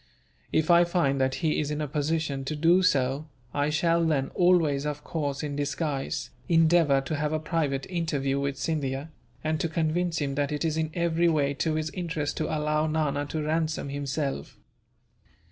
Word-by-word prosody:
If 160 Hz, +2 st, +2 dB
I 170 Hz, 0 st, +7 dB
find 170 Hz, -6 st, +1 dB
that 130 Hz, 0 st, +1 dB
he 155 Hz, -, +2 dB
is 150 Hz, -, -1 dB
in 150 Hz, 0 st, -2 dB
a 150 Hz, -, -1 dB
position 150 Hz, -1 st, -1 dB
to 155 Hz, -, -2 dB
do 165 Hz, +5 st, +4 dB
so, 140 Hz, -4 st, +1 dB, 0.3 s
I 145 Hz, +1 st, +1 dB
shall 165 Hz, +2 st, +2 dB
then 145 Hz, -5 st, +1 dB
always, 165 Hz, -6 st, +3 dB
of 150 Hz, 0 st, -4 dB
course, 145 Hz, -3 st, -3 dB
in 145 Hz, -1 st, -3 dB
disguise 145 Hz, -1 st, -2 dB, 0.2 s
endeavour 165 Hz, -4 st, +4 dB
to 135 Hz, +3 st, -3 dB
have 150 Hz, +1 st, -1 dB
a 155 Hz, -, +1 dB
private 150 Hz, -4 st, -1 dB
interview 145 Hz, -6 st, -1 dB
with 140 Hz, 0 st, -2 dB
Scindia, 145 Hz, -1 st, -2 dB, 0.3 s
and 155 Hz, 0 st, 0 dB
to 165 Hz, -, -1 dB
convince 165 Hz, +2 st, 0 dB
him 140 Hz, -2 st, -1 dB
that 145 Hz, +1 st, -1 dB
it 150 Hz, +2 st, -1 dB
is 155 Hz, -1 st, 0 dB
in 160 Hz, -1 st, 0 dB
every 170 Hz, 0 st, +2 dB
way 145 Hz, -3 st, +1 dB
to 155 Hz, +3 st, -1 dB
his 155 Hz, 0 st, -2 dB
interest 165 Hz, -5 st, -3 dB
to 155 Hz, -, -1 dB
allow 150 Hz, 0 st, 0 dB
Nana 150 Hz, -2 st, 0 dB
to 155 Hz, +1 st, -3 dB
ransom 155 Hz, -1 st, -1 dB
himself. 140 Hz, 0 st, -3 dB
155 Hz, 180 wpm, -27 LUFS, 140-165 Hz, 0.3 s, I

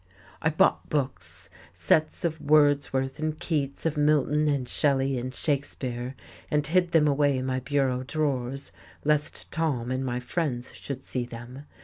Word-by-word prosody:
I 160 Hz, -, +3 dB
bought 155 Hz, -, +2 dB
books, 140 Hz, -3 st, -2 dB, 0.3 s
sets 155 Hz, +2 st, +2 dB
of 160 Hz, -2 st, -2 dB
Wordsworth 145 Hz, -3 st, +3 dB
and 155 Hz, 0 st, -2 dB
Keats, 150 Hz, -6 st, -2 dB
of 160 Hz, -2 st, 0 dB
Milton 150 Hz, 0 st, +3 dB
and 140 Hz, -4 st, 0 dB
Shelley 135 Hz, -2 st, +1 dB
and 130 Hz, +1 st, -4 dB
Shakespeare, 130 Hz, -3 st, -2 dB, 0.3 s
and 150 Hz, -1 st, +1 dB
hid 175 Hz, +2 st, +2 dB
them 155 Hz, -2 st, +5 dB
away 145 Hz, -1 st, +3 dB
in 130 Hz, -, -2 dB
my 130 Hz, 0 st, 0 dB
bureau 130 Hz, -1 st, 0 dB
drawers 135 Hz, -1 st, -2 dB, 0.3 s
lest 150 Hz, 0 st, +1 dB
Tom 135 Hz, -7 st, -1 dB
and 130 Hz, +1 st, -1 dB
my 125 Hz, -1 st, -1 dB
friends 125 Hz, -2 st, -2 dB
should 135 Hz, -2 st, -6 dB
see 125 Hz, -2 st, -2 dB
them. 120 Hz, +4 st, -9 dB
140 Hz, 150 wpm, -27 LUFS, 130-150 Hz, 0.3 s, them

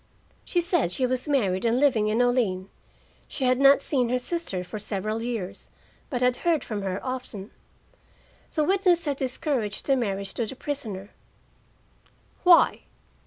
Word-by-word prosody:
She 350 Hz, -, 0 dB
said 340 Hz, -, +1 dB
she 255 Hz, +7 st, 0 dB
was 255 Hz, +3 st, -2 dB
married 200 Hz, -10 st, +1 dB
and 235 Hz, +1 st, +2 dB
living 250 Hz, -7 st, +3 dB
in 220 Hz, +3 st, +2 dB
Olean; 210 Hz, -7 st, 0 dB, 0.6 s
she 270 Hz, -, -5 dB
had 255 Hz, 0 st, +3 dB
not 275 Hz, 0 st, +6 dB
seen 250 Hz, -5 st, +1 dB
her 250 Hz, -, +2 dB
sister 250 Hz, -, -3 dB
for 210 Hz, +4 st, -7 dB
several 215 Hz, +2 st, -3 dB
years, 230 Hz, -6 st, -5 dB, 0.4 s
but 250 Hz, -3 st, -1 dB
had 250 Hz, 0 st, +2 dB
heard 335 Hz, -3 st, +1 dB
from 210 Hz, -3 st, -4 dB
her 190 Hz, -1 st, -2 dB
often. 250 Hz, -6 st, -5 dB, 1.0 s
The 310 Hz, -, +1 dB
witness 360 Hz, -1 st, +2 dB
had 285 Hz, -2 st, -1 dB
discouraged 255 Hz, -5 st, -1 dB
the 275 Hz, -, +3 dB
marriage 200 Hz, -5 st, -2 dB
to 230 Hz, -, -2 dB
the 265 Hz, -, -6 dB
prisoner. 220 Hz, -9 st, -5 dB, 1.3 s
"Why?" 355 Hz, -2 st, +5 dB
250 Hz, 155 wpm, -26 LUFS, 210-280 Hz, 1.3 s, not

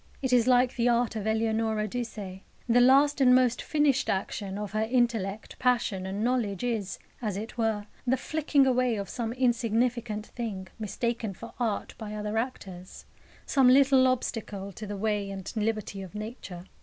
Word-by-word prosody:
It 260 Hz, -2 st, -1 dB
is 245 Hz, -1 st, +4 dB
like 250 Hz, 0 st, +4 dB
the 240 Hz, 0 st, +3 dB
art 235 Hz, -1 st, +1 dB
of 215 Hz, -1 st, -3 dB
Eleonora 220 Hz, -1 st, 0 dB
Duse. 240 Hz, +2 st, -4 dB
The 190 Hz, -3 st, -7 dB, 0.4 s
last 275 Hz, +3 st, +5 dB
and 250 Hz, -1 st, +7 dB
most 255 Hz, -1 st, +3 dB
finished 295 Hz, -3 st, +1 dB
action 195 Hz, 0 st, -2 dB
of 210 Hz, -2 st, -5 dB
her 215 Hz, +1 st, -1 dB
intellect, 220 Hz, -4 st, -1 dB
passion, 235 Hz, -7 st, +1 dB
and 200 Hz, +3 st, -3 dB
knowledge 235 Hz, -6 st, 0 dB
is, 225 Hz, -5 st, -2 dB, 0.2 s
as 210 Hz, -5 st, -2 dB
it 220 Hz, +3 st, -6 dB
were, 220 Hz, -3 st, 0 dB, 0.2 s
the 260 Hz, +2 st, +3 dB
flicking 295 Hz, 0 st, +1 dB
away 250 Hz, -2 st, +2 dB
of 200 Hz, -2 st, -4 dB
some 230 Hz, -2 st, -3 dB
insignificant 235 Hz, -2 st, 0 dB
thing 205 Hz, -7 st, -6 dB
mistaken 225 Hz, 0 st, -2 dB
for 230 Hz, -, -10 dB
art 225 Hz, -4 st, -2 dB
by 215 Hz, -1 st, -6 dB
other 210 Hz, +1 st, -2 dB
actors, 190 Hz, -7 st, -7 dB, 0.4 s
some 270 Hz, -2 st, +4 dB
little 265 Hz, 0 st, +6 dB
obstacle 210 Hz, -6 st, -2 dB
to 210 Hz, +3 st, -8 dB
the 205 Hz, 0 st, -5 dB
way 205 Hz, -1 st, -1 dB
and 195 Hz, -2 st, -6 dB
liberty 215 Hz, -2 st, -2 dB
of 190 Hz, +1 st, -10 dB
Nature. 210 Hz, -5 st, -7 dB
225 Hz, 170 wpm, -28 LUFS, 205-250 Hz, 0.4 s, and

